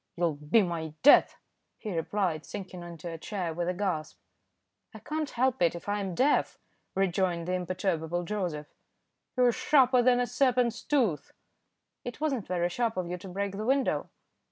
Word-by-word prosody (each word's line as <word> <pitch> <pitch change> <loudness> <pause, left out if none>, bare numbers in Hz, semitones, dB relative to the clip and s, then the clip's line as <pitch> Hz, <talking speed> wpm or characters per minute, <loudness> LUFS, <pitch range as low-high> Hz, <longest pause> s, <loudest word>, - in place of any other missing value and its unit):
"You'll 170 -2 +1
be 150 +9 +2
my 160 -3 -4
death," 290 - +7 0.4
he 210 -5 -5
replied, 165 -1 -1
sinking 185 -3 -7
into 170 -1 -8
a 165 -1 -6
chair 180 -3 -3
with 175 +2 -2
a - - 0
gasp. 180 -5 -2 0.8
"I - - -6
can't 305 -1 -3
help 255 -1 0
it 170 -1 +3
if 170 - -9
I 205 0 0
am 190 -3 -3
deaf," 280 +7 +2 0.4
rejoined 180 -2 0
the 180 - -1
imperturbable 175 -2 -1
Joseph. 175 -6 -4 0.6
"You're 250 -1 +5
sharper 255 -1 +4
than 245 0 +4
a 245 - +2
serpent's 245 -3 +1
tooth." 240 - 0 0.7
"It 245 +2 -7
wasn't 275 -8 -1
very 175 -1 0
sharp 225 +3 -1
of 175 -1 -2
you 180 - -4
to 190 - -10
break 195 +1 -3
the 215 - -3
window." 270 +3 +1
190 Hz, 170 wpm, -29 LUFS, 170-240 Hz, 0.8 s, death